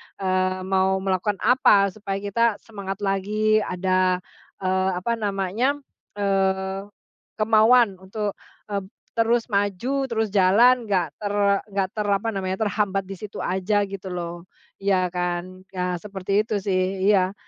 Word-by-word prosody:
eee, 185 -1 0
mau 190 0 +2
melakukan 195 +2 0
apa 205 -6 +5
supaya 195 0 -5
kita 225 +2 +2
semangat 200 -2 -6
lagi 210 +2 +1
ada, 185 -1 +1 0.4
eee, 185 0 +1
apa 180 +6 -2
namanya, 205 +6 0 0.4
eee, 195 -1 0 0.5
kemauan 220 -1 +4
untuk, 205 +2 -3 0.4
eee, 200 - 0 0.4
terus 230 +1 +2
maju, 205 +7 0
terus 225 -4 -1
jalan 220 +6 +5
enggak 195 -4 +1
ter 205 -1 -3 0.4
enggak 195 -1 0
ter 210 -1 -2
apa 200 +2 +1
namanya 190 -3 -2 0.2
terhambat 200 -1 0
di 195 0 -8
situ 210 +2 -7
aja 190 +3 +1
gitu 195 -1 -7
loh, 170 0 -5 0.3
iya 190 -2 +1
kan 180 +1 -4
nah 180 -1 -1
seperti 200 +2 -1
itu 210 -3 -2
sih 190 0 0
iya 190 -2 +3
195 Hz, 135 wpm, -24 LUFS, 185-210 Hz, 0.5 s, apa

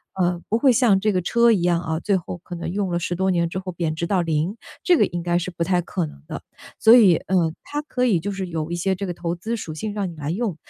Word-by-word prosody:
呃， 180 -2 0
不 225 - +1
会 265 0 +5
像 230 -6 +4
这 215 +2 +1
个 185 -2 0
车 235 +5 +4
一 195 -6 +2
样， 175 -1 +2
嗯， 160 - 0
最 200 - +2
后 180 -1 -4
可 180 - -9
能 170 0 -4
用 195 -1 -2
了 175 - 0
10 175 +1 -2
多 190 +2 +1
年 170 -2 +1
之 175 - -5
后 185 -1 -4
贬 165 -2 -2
值 170 +2 -2
到 185 0 +1
0， 165 +4 -1 0.3
这 360 - +5
个 - - +4
应 175 0 -5
该 175 0 +1
是 175 - -4
不 170 -2 -3
太 180 0 +1
可 175 0 -3
能 70 - -11
的。 - - -5 0.4
所 220 - +6
以， 200 -9 +7
呃， 170 -3 0
它 295 0 -4
可 250 -4 -1
以 200 -9 +3
就 205 +5 -4
是 195 -1 -4
有 165 -2 -4
一 175 - -2
些 190 +3 0
这 195 +1 -4
个 175 - -3
投 170 -1 -3
资 220 +7 -4
属 165 -7 -6
性 210 +7 -4
让 205 -2 -2
你 170 - -8
来 150 -1 -5
用。 200 0 -2
180 Hz, 305 characters per minute, -22 LUFS, 170-205 Hz, 0.4 s, 以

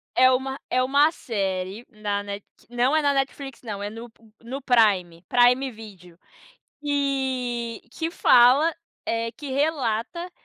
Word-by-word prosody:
É 255 0 +6
uma 265 +2 -1
é 255 0 +2
uma 285 +4 +4
série 195 - -3
na 210 -3 -3
Net 200 0 -7 0.2
não 245 +4 +1
é 315 - +3
na 285 -1 +2
Netflix 270 -1 -3
não, 210 -4 -6
é 205 - -3
no 230 +2 -10 0.3
no 260 +4 -6
Prime, 200 -10 +2
Prime 250 +2 +4
Video, 190 -6 -13 0.6
e 265 -5 -1
que 325 +5 -3
fala, 275 +3 +5 0.3
eh, 230 0 -1
que 290 0 -8
relata 280 +3 -1
245 Hz, 140 wpm, -24 LUFS, 215-275 Hz, 0.6 s, É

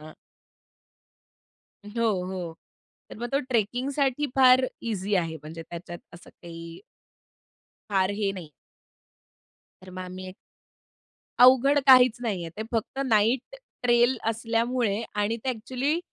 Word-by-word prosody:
हां. 155 +1 -12 1.7
हो, 230 +3 -3 0.2
हो. 180 -3 -6 0.5
तर - - -9
मग 240 +1 -4
तो 275 - +2
ट्रेकिंगसाठी 260 +5 0
फार 255 0 +7 0.3
ईझी 200 0 -2
आहे 165 -2 -1
म्हणजे 165 +2 -8
त्याच्यात 175 +1 -9 0.2
असं 175 - -14
काही 165 -1 -11 1.1
फार 190 -1 +2
हे 205 -2 0
नाही. 175 -6 -9 1.3
तर 185 - -12
मग 185 0 -7
आम्ही 185 +1 -8
एक 185 - -11 1.0
अवघड 260 +3 +6
काहीच 255 -3 +7
नाही 210 -8 -2
आहे. 165 - -7
ते 220 - -3
फक्त 225 +4 -2
नाईट 235 - +1 0.3
ट्रेल 240 +1 +3
असल्यामुळे 230 -1 -1
आणि 210 +2 0
ते 265 - -2
अ‍ॅक्च्युअली 255 +6 -1
220 Hz, 125 wpm, -26 LUFS, 185-250 Hz, 1.7 s, फार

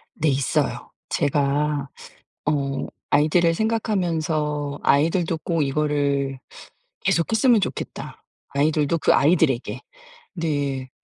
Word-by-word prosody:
네 160 - 0
있어요. 135 -1 0 0.2
제가 145 0 0 0.6
어 140 -2 -1 0.2
아이들을 165 +3 +3
생각하면서 165 -9 -1
'아이들도 165 +3 +2
꼭 165 -2 0
이거를 140 -1 0 0.7
계속했으면 225 +6 +3
좋겠다, - - -5 0.3
아이들도 150 +2 +1
그 - - +4
아이들에게.' 145 -4 +2 0.5
네 145 -5 -2
150 Hz, 235 characters per minute, -23 LUFS, 140-165 Hz, 0.7 s, 그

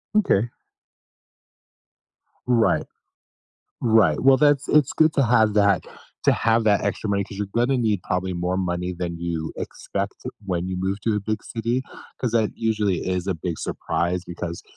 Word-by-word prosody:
Okay. 120 - +3 2.0
Right. 120 -3 +3 1.0
Right, 110 -10 +4
well, 135 0 +6
that's 145 -1 +3
it's 150 -3 +4
good 155 0 +3
to 140 - +3
have 110 -2 +4
that 100 -3 +3 0.4
to - - +6
have 115 0 +2
that 105 -2 +3
extra 105 - -2
money 100 0 +1
'cause 95 - -10
you're 105 -1 -2
gonna 125 +3 +2
need 105 -6 0
probably 90 0 -2
more 90 +1 -1
money 90 -1 -2
than 85 -1 -4
you 85 -2 -3
expect - - -4 0.3
when 90 -2 -2
you 95 - -3
move 95 +2 -2
to 110 +1 0
a 105 - -1
big 110 +1 -2
city, 115 +3 -2 0.4
'cause 125 - -1
that 110 -2 +2
usually 105 -4 +1
is 90 0 -1
a 95 - 0
big 85 0 -4
surprise, 90 +1 -2
because, 85 -1 -6
100 Hz, 165 wpm, -23 LUFS, 90-115 Hz, 2.0 s, well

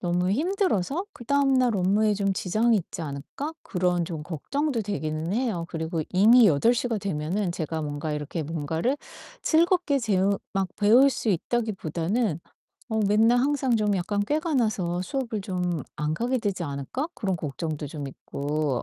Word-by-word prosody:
너무 180 +1 0
힘들어서 335 - 0
'그다음날 260 -2 +2
업무에 205 +3 +2
좀 195 -1 0
지장이 215 +5 +2
있지 170 -1 -6
않을까?' 150 - -5
그런 180 -2 0
좀 160 -4 -5
걱정도 235 - -2
되기는 165 -5 -3
해요. 225 -9 -1
그리고 160 -1 -2
이미 220 +5 +7
8:00 230 - +3
가 230 - 0
되면은 185 0 -2
제가 160 -2 -3
뭔가 150 +1 -3
이렇게 150 +2 -3
뭔가를 165 - -1 0.5
즐겁게 335 -3 +3
재우 200 -3 +1 0.2
막 190 -1 +1
배울 235 +7 +6
수 235 -2 -3
있다기보다는 195 -2 -1 0.5
어 220 - +1
맨날 225 +4 +4
항상 265 -2 +2
좀 210 -2 +1
약간 205 +3 -1
꾀가 310 - -1
나서 185 -8 0
'수업을 235 -2 -3
좀 180 -5 -2
안 150 +1 -1
가게 245 +8 0
되지 200 -6 -2
않을까?' 140 - -4
그런 190 -4 -1
걱정도 155 0 -4
좀 145 -1 -6
있고 145 0 -2
195 Hz, 315 characters per minute, -26 LUFS, 165-240 Hz, 0.5 s, 이미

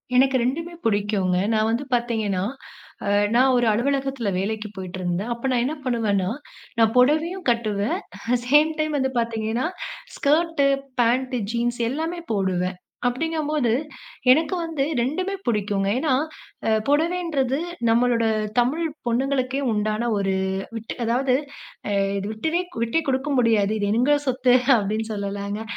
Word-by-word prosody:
எனக்கு 265 +1 +4
2மே 330 +7 -2
பிடிக்கும்ங்க, 200 -4 +1
நான் 215 0 +2
வந்து 240 +5 0
பாத்தீங்கன்னா, 220 -6 -1 0.6
அ - - 0 0.3
நான் 260 +1 +5
ஒரு 240 - +2
அலுவலகத்துல 270 -1 0
வேலைக்கு 215 +1 -3
போயிட்ருந்தேன். 185 +3 -3
அப்ப 235 +3 -3
நான் 240 -1 +2
என்ன 305 +4 -2
பண்ணுவேன்னா, 205 -6 +1 0.5
நான் 225 0 +4
பொடவையும் 315 +6 +2
கட்டுவேன் 215 -2 -1 0.5
சேம் 300 +3 +5
டைம் 310 -1 0
வந்து 265 0 0
பாத்தீங்கன்னா, 230 +4 -1 0.5
ஸ்கர்ட்டு, 305 -1 +2 0.3
பேண்ட், 250 +2 +1 0.2
ஜீன்ஸ் 240 0 -1
எல்லாமே 325 +4 -3
போடுவேன். 185 -2 0 0.3
அப்டிங்கும்போது, 300 -1 0 0.6
எனக்கு 320 +6 +3
வந்து 320 -4 -1 0.2
2மே 365 +11 -1
புடிக்கும்ங்க. 205 -3 0
ஏன்னா, 300 -4 +1 0.5
அ - - +3 0.2
புடவைன்றது 300 -3 +1 0.3
நம்மளோட 235 0 +3 0.4
தமிழ் 300 +8 +1 0.2
பொண்ணுங்களுக்கே 265 +2 0
உண்டான 215 +2 0
ஒரு 195 -1 0 0.4
விட் 225 0 -5
அதாவது, 250 +3 +2 0.5
அ - - -1 0.3
இது 200 - -3
விட்டுவே 320 +11 -1 0.2
விட்டே 235 +8 +1
குடுக்க 265 +3 0
முடியாது. 220 -4 +3
இது 205 - -1
எங்க 275 +5 +4
சொத்து 255 -1 +2 0.2
அப்டின்னு 215 +2 -1
சொல்லலாம்ங்க. 200 +1 -4
240 Hz, 125 wpm, -23 LUFS, 215-280 Hz, 0.6 s, நான்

